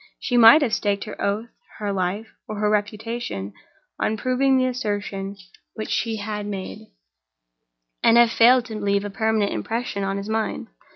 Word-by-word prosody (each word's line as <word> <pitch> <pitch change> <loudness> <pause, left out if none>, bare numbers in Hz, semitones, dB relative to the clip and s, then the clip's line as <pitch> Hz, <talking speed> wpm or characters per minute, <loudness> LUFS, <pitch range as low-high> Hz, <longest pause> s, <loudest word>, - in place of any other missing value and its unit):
She 245 - -2
might 240 +6 +8
have 235 -5 -1
staked 205 -2 0
her 215 - -8
oath, 210 +4 -1 0.3
her 205 -2 -2
life, 195 +4 -2 0.2
or 215 - -5
her 210 0 +1
reputation, 210 - -3 0.5
on 220 - 0
proving 260 +3 +2
the 255 - +2
assertion 205 -5 -3 0.4
which 215 - -5
she 225 -1 0
had 210 -1 -4
made, 195 -2 -6 1.1
and 230 - +5
have 235 -1 +6
failed 245 +2 +5
to 220 -3 -6
leave 200 0 0
a 205 - -5
permanent 220 0 0
impression 225 -3 -3
on 195 0 -1
his 200 +1 -5
mind. 220 0 -2
215 Hz, 165 wpm, -23 LUFS, 200-230 Hz, 1.1 s, might